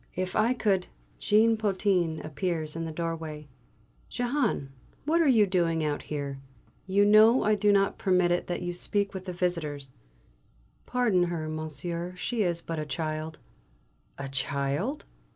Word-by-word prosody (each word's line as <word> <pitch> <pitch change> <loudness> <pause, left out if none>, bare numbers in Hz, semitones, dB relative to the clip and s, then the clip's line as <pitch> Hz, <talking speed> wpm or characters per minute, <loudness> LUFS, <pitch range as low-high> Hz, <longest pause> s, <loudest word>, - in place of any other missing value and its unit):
If 185 0 -3
I 230 +4 +3
could 195 -6 +1 0.2
" - - -35
Jean 220 +2 +5
Potin 185 -6 0
appears 155 -1 -3
in 165 0 -3
the 160 - -4
doorway. 160 -2 -5 0.6
"Jehane, 245 - -1 0.4
what 330 +3 +3
are 325 - +3
you 225 -6 +5
doing 170 -4 +1
out 150 -1 -1
here? 140 -2 -5 0.5
You 200 +2 +3
know 215 +4 +6
I 215 - +3
do 210 0 +3
not 195 -1 +2
permit 180 -2 +2
it 175 - 0
that 175 0 -3
you 175 0 -3
speak 200 +3 -1
with 190 -1 -6
the 185 - -4
visitors. 160 -6 -2 1.0
Pardon 220 -8 +2
her, 170 -3 -3
monsieur, 155 +3 -4
she 225 +5 -2
is 170 -3 0
but 165 -1 -4
a 155 - -3
child." 155 +2 -3 0.8
"A 140 - -5
child?" 140 - -2
175 Hz, 155 wpm, -28 LUFS, 155-205 Hz, 1.0 s, know